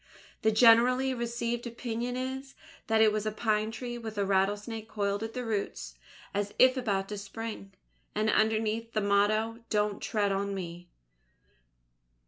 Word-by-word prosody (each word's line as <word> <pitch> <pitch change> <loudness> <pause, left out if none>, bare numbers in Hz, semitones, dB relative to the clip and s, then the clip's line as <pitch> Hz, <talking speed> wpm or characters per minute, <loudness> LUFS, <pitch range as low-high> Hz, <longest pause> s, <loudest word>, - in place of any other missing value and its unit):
The 220 - +4
generally 245 +4 +5
received 235 0 -2
opinion 240 +1 -3
is, 265 +1 -5 0.3
that 220 0 +3
it 220 -1 +6
was 215 0 -2
a - - 0
Pine 215 0 0
Tree 240 +1 -5
with 220 -2 -7
a 200 - +1
rattlesnake 205 +3 0
coiled 200 -1 -1
at 225 +1 -5
the 250 -1 -3
roots 215 -3 -3 0.4
as 205 0 -2
if 255 0 +6
about 200 -7 -1
to 210 -1 -4
spring, 205 0 -7 0.4
and 215 +1 +1
underneath 220 +1 +1
the 215 - +1
motto: 215 +3 +2
DON'T 210 -1 0
TREAD 205 -2 0
ON 200 0 -1
ME! 175 -1 -7
220 Hz, 150 wpm, -30 LUFS, 205-235 Hz, 0.4 s, it